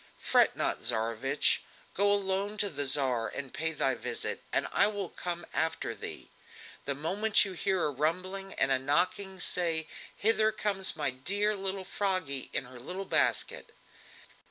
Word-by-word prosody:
"Fret -, -, +3 dB
not, -, -, -1 dB
Tsarevich! 115 Hz, +4 st, +1 dB, 0.3 s
Go 200 Hz, +1 st, +3 dB
alone 200 Hz, +1 st, 0 dB
to 205 Hz, -2 st, +1 dB
the 145 Hz, -2 st, 0 dB
Tsar 130 Hz, -4 st, +5 dB
and 135 Hz, -2 st, -7 dB
pay 160 Hz, +1 st, 0 dB
thy 135 Hz, -4 st, 0 dB
visit, 120 Hz, 0 st, -3 dB
and -, -, +1 dB
I -, -, +4 dB
will 205 Hz, -4 st, -4 dB
come 175 Hz, -1 st, -5 dB
after 160 Hz, 0 st, -1 dB
thee. -, -, -6 dB, 0.5 s
The 140 Hz, -, -1 dB
moment 200 Hz, +10 st, +2 dB
you 195 Hz, -, -5 dB
hear 190 Hz, 0 st, 0 dB
a 150 Hz, -, +1 dB
rumbling, 185 Hz, +7 st, -2 dB
and 135 Hz, -, +2 dB
a 130 Hz, -, +4 dB
knocking, 180 Hz, +7 st, 0 dB
say: 165 Hz, -3 st, +2 dB, 0.3 s
'Hither 220 Hz, 0 st, +3 dB
comes 200 Hz, -3 st, 0 dB
my -, -, 0 dB
dear 200 Hz, +11 st, -1 dB
little 195 Hz, -1 st, 0 dB
Froggy 185 Hz, -10 st, -2 dB
in 135 Hz, -, -1 dB
her 125 Hz, 0 st, -12 dB
little 185 Hz, +10 st, -5 dB
basket!'" -, -, +1 dB
175 Hz, 155 wpm, -30 LUFS, 140-195 Hz, 0.5 s, Tsar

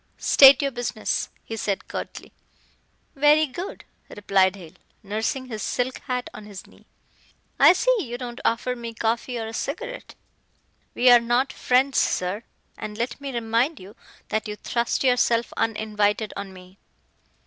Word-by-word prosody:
"State 275 Hz, 0 st, +7 dB
your 275 Hz, -, 0 dB
business," 240 Hz, -3 st, -2 dB
he 225 Hz, -, -6 dB
said 200 Hz, -3 st, -3 dB
curtly. -, -, -7 dB, 0.8 s
"Very 295 Hz, +2 st, +5 dB
good," 345 Hz, +7 st, -7 dB, 0.2 s
replied 195 Hz, -2 st, +2 dB
Hale, 170 Hz, -5 st, -12 dB, 0.3 s
nursing 220 Hz, +6 st, -2 dB
his 220 Hz, -4 st, -6 dB
silk 250 Hz, +4 st, -2 dB
hat 250 Hz, -1 st, -2 dB
on 210 Hz, -, -10 dB
his 200 Hz, -2 st, -10 dB
knee. -, -, -21 dB, 0.7 s
"I -, -, +8 dB
see -, -, +2 dB
you 245 Hz, -, -4 dB
don't 245 Hz, -1 st, -7 dB
offer 240 Hz, +2 st, 0 dB
me 230 Hz, -1 st, -7 dB
coffee 230 Hz, +2 st, -1 dB
or 225 Hz, -, -3 dB
a 220 Hz, -, -7 dB
cigarette." -, -, -5 dB, 0.8 s
"We 250 Hz, 0 st, +5 dB
are 240 Hz, -, +9 dB
not 240 Hz, +3 st, 0 dB
friends, 260 Hz, +2 st, +2 dB
sir. 185 Hz, +4 st, 0 dB, 0.4 s
And 210 Hz, 0 st, -6 dB
let 240 Hz, +4 st, -3 dB
me 280 Hz, -1 st, -5 dB
remind 235 Hz, +5 st, 0 dB
you 195 Hz, +3 st, -13 dB, 0.3 s
that 215 Hz, 0 st, -1 dB
you 210 Hz, -, -5 dB
thrust 235 Hz, +4 st, -1 dB
yourself 240 Hz, -2 st, +2 dB
uninvited 215 Hz, -1 st, 0 dB
on 200 Hz, -1 st, -6 dB
me." 185 Hz, +1 st, -15 dB
235 Hz, 150 wpm, -24 LUFS, 210-255 Hz, 0.8 s, are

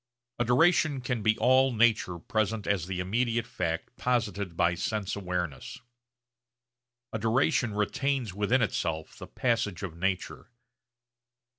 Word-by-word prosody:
A 120 Hz, -, +2 dB
duration 150 Hz, +3 st, +3 dB
can 125 Hz, -3 st, -2 dB
be 110 Hz, +1 st, +2 dB
all 130 Hz, +1 st, +4 dB
nature 110 Hz, -6 st, +2 dB
present 110 Hz, +4 st, -1 dB
as 95 Hz, -5 st, 0 dB
the 95 Hz, -1 st, -3 dB
immediate 115 Hz, +5 st, 0 dB
fact 90 Hz, -3 st, -3 dB
posited 105 Hz, -8 st, -1 dB
by 85 Hz, 0 st, +3 dB
sense 105 Hz, +3 st, -2 dB
awareness. 90 Hz, -8 st, -4 dB, 1.3 s
A 110 Hz, -, -2 dB
duration 120 Hz, 0 st, +1 dB
retains 130 Hz, +1 st, -1 dB
within 105 Hz, +5 st, +2 dB
itself 80 Hz, -6 st, -3 dB
the -, -, -8 dB
passage 115 Hz, -7 st, -1 dB
of 90 Hz, -4 st, -5 dB
nature. 95 Hz, +4 st, -3 dB
110 Hz, 125 wpm, -28 LUFS, 90-125 Hz, 1.3 s, all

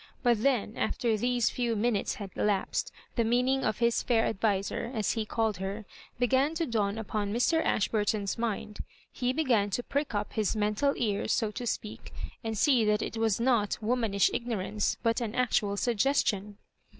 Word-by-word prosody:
But 240 Hz, -4 st, +3 dB
then 245 Hz, -4 st, +1 dB
after 230 Hz, -3 st, 0 dB
these 245 Hz, +2 st, +1 dB
few 240 Hz, -2 st, -1 dB
minutes 215 Hz, -1 st, 0 dB
bad 200 Hz, -3 st, -7 dB
elapsed 205 Hz, -2 st, 0 dB, 0.2 s
the 235 Hz, -, +2 dB
meaning 250 Hz, +4 st, +2 dB
of 215 Hz, -, 0 dB
his 235 Hz, -1 st, +2 dB
fiiir 230 Hz, -2 st, +2 dB
adviser, 210 Hz, +2 st, -1 dB
as 215 Hz, -3 st, +1 dB
he 220 Hz, -2 st, -2 dB
called 220 Hz, -4 st, 0 dB
her, 195 Hz, +3 st, -5 dB, 0.3 s
began 265 Hz, +5 st, +2 dB
to 330 Hz, 0 st, 0 dB
dawn 215 Hz, -4 st, 0 dB
upon 205 Hz, -1 st, -2 dB
Mr. 250 Hz, +9 st, +2 dB
Aidiburton's 210 Hz, -1 st, 0 dB
mind. 215 Hz, -2 st, -3 dB, 0.3 s
He 245 Hz, 0 st, -1 dB
b^n 255 Hz, -8 st, +2 dB
to 240 Hz, +5 st, -2 dB
prick 280 Hz, -4 st, -2 dB
up 205 Hz, 0 st, -2 dB
his 215 Hz, 0 st, 0 dB
mental 215 Hz, +7 st, +1 dB
ears; 215 Hz, -2 st, 0 dB
so 220 Hz, -2 st, +1 dB
to 245 Hz, +2 st, -5 dB
speak, 215 Hz, -1 st, -4 dB, 0.3 s
and 225 Hz, -1 st, -3 dB
see 255 Hz, -1 st, +4 dB
that 210 Hz, 0 st, +2 dB
it -, -, -5 dB
was 225 Hz, -2 st, +1 dB
not 230 Hz, -4 st, +2 dB
womanish 220 Hz, -4 st, +1 dB
ignorance, 215 Hz, -3 st, -1 dB
but 230 Hz, +1 st, +1 dB
an 230 Hz, -1 st, -3 dB
actual 210 Hz, -5 st, +1 dB
suggestion. 210 Hz, -4 st, +1 dB
225 Hz, 170 wpm, -29 LUFS, 210-245 Hz, 0.3 s, see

